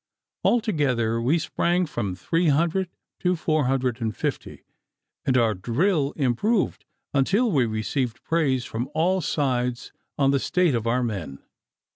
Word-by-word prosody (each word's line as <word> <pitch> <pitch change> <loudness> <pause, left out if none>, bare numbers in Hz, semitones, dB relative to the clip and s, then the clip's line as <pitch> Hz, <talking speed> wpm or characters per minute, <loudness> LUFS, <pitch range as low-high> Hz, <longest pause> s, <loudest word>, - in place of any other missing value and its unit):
Altogether 135 - +1
we 135 +8 +2
sprang 175 +2 0
from 100 - -3
three 165 - 0
hundred 170 +5 +2 0.3
to 180 0 +1
four 155 -3 0
hundred 130 -2 0
and 110 -2 -2
fifty, - - -4 0.6
and 130 -1 +3
our 115 -3 +3
drill 140 - 0
improved 155 - 0 0.3
until 200 - +2
we 130 -6 +2
received 115 +3 -2
praise 140 -7 +1
from 120 +4 -4
all 180 +4 +2
sides 125 -5 -1 0.3
on 135 -1 +3
the 140 - +2
state 180 +1 +2
of 115 -1 -1
our 125 +2 +1
men. 95 - -5
135 Hz, 140 wpm, -24 LUFS, 120-170 Hz, 0.6 s, and